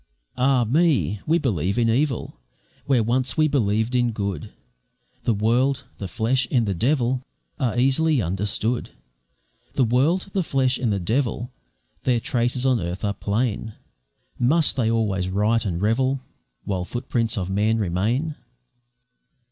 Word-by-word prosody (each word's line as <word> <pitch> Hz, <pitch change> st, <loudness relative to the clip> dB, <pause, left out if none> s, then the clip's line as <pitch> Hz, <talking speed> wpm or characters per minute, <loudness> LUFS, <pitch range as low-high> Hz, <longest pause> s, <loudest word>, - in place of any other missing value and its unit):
Ah, 130 Hz, -1 st, +3 dB
me! 135 Hz, -, +2 dB
we 165 Hz, +2 st, +4 dB
believe 100 Hz, -, -1 dB
in 120 Hz, -1 st, +3 dB
evil, 130 Hz, +2 st, 0 dB, 0.5 s
Where 125 Hz, -5 st, +3 dB
once 125 Hz, +4 st, 0 dB
we 155 Hz, 0 st, +4 dB
believed 110 Hz, -4 st, +1 dB
in 120 Hz, -2 st, +2 dB
good, 100 Hz, -6 st, -4 dB, 0.7 s
The 115 Hz, -, +3 dB
world, 125 Hz, +6 st, +1 dB, 0.2 s
the 100 Hz, -, -4 dB
flesh, 120 Hz, +5 st, +1 dB
and 120 Hz, -4 st, +2 dB
the 100 Hz, -, 0 dB
devil 125 Hz, -, +1 dB, 0.4 s
Are 125 Hz, -4 st, 0 dB
easily 135 Hz, +4 st, +3 dB
understood; 105 Hz, +5 st, -1 dB, 0.8 s
The 130 Hz, -, +2 dB
world, 145 Hz, -, +2 dB
the 195 Hz, -, +1 dB
flesh, 130 Hz, -5 st, +1 dB
and 120 Hz, -4 st, 0 dB
the 100 Hz, -, 0 dB
devil 120 Hz, +5 st, -1 dB, 0.5 s
Their 125 Hz, -2 st, +2 dB
traces 125 Hz, -1 st, -1 dB
on 130 Hz, -3 st, +3 dB
earth 90 Hz, +3 st, -4 dB
are 100 Hz, -, 0 dB
plain; 110 Hz, +2 st, -2 dB, 0.7 s
Must 150 Hz, +6 st, +3 dB
they 115 Hz, -4 st, +1 dB
always 100 Hz, -5 st, 0 dB
riot 105 Hz, +4 st, +1 dB
and 85 Hz, -4 st, -2 dB
revel 130 Hz, +6 st, +1 dB, 0.4 s
While 95 Hz, -3 st, -2 dB
footprints 115 Hz, +1 st, -2 dB
of 95 Hz, -1 st, -2 dB
man 105 Hz, +3 st, +2 dB
remain? 110 Hz, -, 0 dB
120 Hz, 140 wpm, -23 LUFS, 105-130 Hz, 0.8 s, we